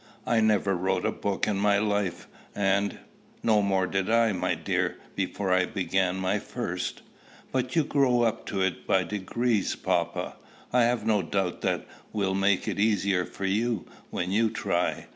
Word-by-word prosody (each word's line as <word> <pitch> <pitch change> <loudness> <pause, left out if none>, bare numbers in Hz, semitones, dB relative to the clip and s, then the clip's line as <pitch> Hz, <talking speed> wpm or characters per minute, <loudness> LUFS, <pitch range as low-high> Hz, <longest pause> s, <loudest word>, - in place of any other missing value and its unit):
I 115 - +2
never 105 -3 +3
wrote 95 +2 0
a - - +2
book 100 0 -2
in 105 -2 0
my 100 0 +3
life, 100 -3 -1 0.3
and" 100 0 +1 0.5
"No 110 -2 +4
more 95 -2 +2
did 95 +1 -1
I, 115 -1 +4
my 90 -2 0
dear, 80 -1 -1 0.2
before 100 -2 -1
I 90 0 +3
began 95 -1 0
my 95 0 0
first." - - -4 0.5
"But 130 -1 -1
you 160 - +4
grew 130 -4 +3
up 115 -1 -1
to 95 - -2
it 95 -2 -2
by 95 -1 +3
degrees, 105 +2 -1
papa!" - - -1 0.4
"I 125 -1 +5
have 120 -2 0
no 110 -3 +3
doubt 95 +1 -2
that - - 0 0.3
will 100 -3 0
make 95 0 +2
it - - -2
the 100 - +3
easier 100 -4 +2
for 100 - -6
you, 110 +2 0 0.2
when 90 +1 -2
you 110 +3 +3
try. - - -1
100 Hz, 175 wpm, -27 LUFS, 95-110 Hz, 0.5 s, I